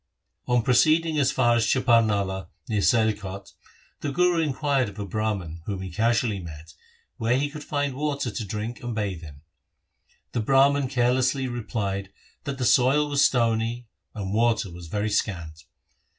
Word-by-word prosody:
On 120 -1 +2
proceeding 155 +6 +3
as 140 - +3
far 120 -2 +3
as 115 -1 +2
Chaparnala 105 -7 +2 0.2
near 105 -2 0
Sialkot, 100 -4 0 0.5
the 145 - -3
Guru 180 +3 +2
inquired 140 -4 0
of 100 - -14
a 100 - -4
Brahman, 100 -5 -3
whom 95 -2 -3
he 95 - -6
casually 115 +1 +1
met, 80 -2 -10 0.4
where 115 +2 +1
he 145 +1 -1
could 150 0 -8
find 145 -2 -2
water 140 -3 -2
to 105 - -4
drink 110 +4 -5
and 120 -1 -4
bathe 100 -6 -3
in. 75 -3 -11 0.9
The - - -2
Brahman 135 +3 +3
carelessly 130 +1 +1
replied, 100 -5 -3 0.4
that 140 -1 -3
the 130 - -1
soil 135 +5 +4
was 140 -1 +3
stony 115 -1 +1 0.3
and 100 -2 -4
water 110 -3 +1
was 85 -1 -10
very 105 +5 -2
scant. 85 -6 -2
115 Hz, 155 wpm, -25 LUFS, 100-130 Hz, 0.9 s, soil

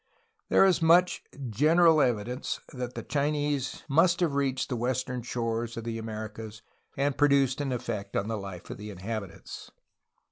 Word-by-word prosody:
There - - +6
is 185 -2 +3
much 175 +2 +4 0.3
general 160 - +5
evidence 125 0 -1
that 125 -1 -5
Chinese 145 -2 -1
must 165 +5 +4
have 165 -5 +2
reached 135 -1 0
the 125 - -1
western 125 +1 -2
shores 115 -1 -3
of 115 - -4
the 115 0 -4
Americas 110 0 -7 0.3
and 140 0 +1
produced 140 -1 +3
an 140 -2 -2
effect 105 -5 -4
on 100 - 0
the 115 - -2
life 95 -3 -8
of - - -6
the 105 +1 -7
inhabitants. 100 0 -7
125 Hz, 150 wpm, -28 LUFS, 110-145 Hz, 0.3 s, There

